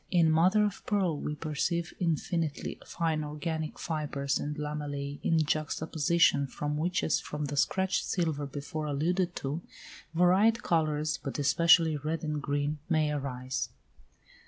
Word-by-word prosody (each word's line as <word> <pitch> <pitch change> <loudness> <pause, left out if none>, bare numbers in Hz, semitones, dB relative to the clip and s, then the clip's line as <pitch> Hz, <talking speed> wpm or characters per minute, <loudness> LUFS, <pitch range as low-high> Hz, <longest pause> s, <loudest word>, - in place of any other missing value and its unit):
In 170 -3 +4
mother 185 +7 +4
of 205 -2 -4
pearl 190 -6 +1
we 150 - -3
perceive 165 +3 -2
infinitely 165 -2 -1
fine 160 -2 -1
organic 155 +1 -4
fibres 145 -4 -2
and 150 +1 -3
lamellæ 145 -1 -4
in 165 - +2
juxta 155 +1 -1
position, 155 -2 +3
from 150 +2 -3
which, 175 +4 0
as 160 - +2
from 150 0 -4
the 145 0 -4
scratched 190 +6 +1
silver 160 -5 -1
before 150 +3 -5
alluded 175 +5 0
to, 145 +5 -3 0.5
varied 190 +7 +4
colours, 155 -2 +1
but 135 - -4
especially 160 +1 +5
red 155 +3 -3
and 150 -1 -2
green, 145 +1 -1
may 155 -3 +2
arise. 130 -3 -3
155 Hz, 140 wpm, -30 LUFS, 145-170 Hz, 0.5 s, especially